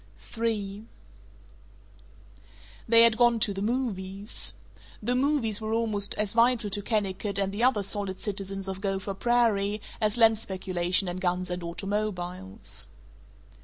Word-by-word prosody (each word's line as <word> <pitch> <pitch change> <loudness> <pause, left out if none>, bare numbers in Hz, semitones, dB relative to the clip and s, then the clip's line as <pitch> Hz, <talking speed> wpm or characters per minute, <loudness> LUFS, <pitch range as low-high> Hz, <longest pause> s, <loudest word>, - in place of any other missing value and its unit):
III 210 -3 -2 2.1
They 230 0 +8
had 230 -1 +5
gone 240 -1 +4
to 205 - +3
the 195 - -5
"movies." 200 - -3 0.4
The 240 +4 -1
movies 250 -5 +1
were 220 0 -2
almost 215 -3 0
as 210 -1 -1
vital 230 -2 +3
to 205 +1 0
Kennicott 200 -2 -1
and 195 -1 +2
the 215 +4 -1
other 250 -5 +3
solid 200 -1 -2
citizens 195 -1 -4
of 190 0 -5
Gopher 195 0 -2
Prairie 215 -2 +2 0.2
as 215 +1 +1
land 225 -2 +5
speculation 185 -1 +1
and 175 +1 -4
guns 180 0 -1
and 180 0 -3
automobiles. 190 +1 -4
205 Hz, 130 wpm, -27 LUFS, 190-225 Hz, 2.1 s, They